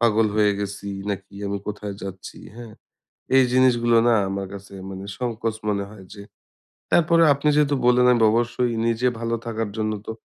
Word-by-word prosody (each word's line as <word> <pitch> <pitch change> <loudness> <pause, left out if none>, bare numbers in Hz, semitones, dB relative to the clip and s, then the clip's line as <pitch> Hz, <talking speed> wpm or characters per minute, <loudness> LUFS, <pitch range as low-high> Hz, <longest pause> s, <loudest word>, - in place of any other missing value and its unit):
পাগল 115 -2 +3
হয়ে 105 -1 +4
গেছি 100 0 -5 0.2
নাকি 100 0 -6
আমি 100 0 -2
কোথায় 105 -1 -5
যাচ্ছি!" 95 -1 -8 0.2
হ্যাঁ? 120 -2 -10 0.6
এই 135 - +7
জিনিসগুলো 120 -2 +4
না 120 - +5 0.2
আমার 95 0 -4
কাছে 100 0 -11 0.2
মানে 95 +1 -7
সংকোচ 115 -2 -3
মনে 100 -1 -1
হয় 100 -3 -13
যে, 100 - -11 0.7
তারপরেও 165 -1 +4
আপনি 140 +2 -3
যেহেতু 145 -1 +3
বললেন 125 0 +5
অ্যান্ড 120 -2 +4
অবশ্যই 120 +1 0
নিজে 115 +2 +1
ভালো 115 0 -1
থাকার 115 -2 -3
জন্য 110 0 -1 0.2
তো - - -3
115 Hz, 170 wpm, -23 LUFS, 100-120 Hz, 0.7 s, এই